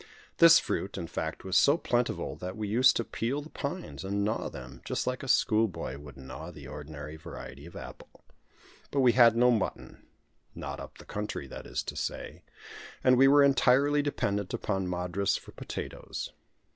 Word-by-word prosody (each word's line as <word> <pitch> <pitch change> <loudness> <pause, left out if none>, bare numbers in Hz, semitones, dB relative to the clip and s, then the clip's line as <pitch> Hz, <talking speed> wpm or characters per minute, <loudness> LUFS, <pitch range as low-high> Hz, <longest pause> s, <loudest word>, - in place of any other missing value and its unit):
This 165 0 +9
fruit, 100 - -2
in 85 - -3
fact, 80 -1 -4
was 95 -1 -2
so 145 +3 +6
plentiful 120 -6 -1
that 90 +2 -6
we 105 -1 -3
used 125 +5 +5
to 115 - +1
peel 120 +5 -2
the 155 - -13
pines, 170 - -5
and 100 +1 -1
gnaw 110 +2 -1
them, 65 0 -10
just - - -2
like 125 0 -2
a 135 - -6
school 110 -3 +4
boy 95 - -5
would 70 -1 -12
gnaw 65 0 -8
the - - -11
ordinary 75 +1 -8
variety 70 -1 -9
of 85 - -13
apple. - - -11 0.7
But 140 - +1
we 125 -2 +6
had 115 -2 +6
no 125 +1 +5
mutton 110 -5 -3 0.5
not - - -5
up - - -9
the - - -13
country, 105 +1 -4
that - - -8
is - - -2
to - - -6
say; - - -4 0.6
and 130 0 +6
we 135 +2 +6
were 145 +1 +7
entirely 140 +1 +4
dependent 100 -9 -1
upon 95 -1 -2
Madras 90 +2 0
for - - -12
potatoes. - - -6
110 Hz, 185 wpm, -29 LUFS, 90-130 Hz, 0.7 s, This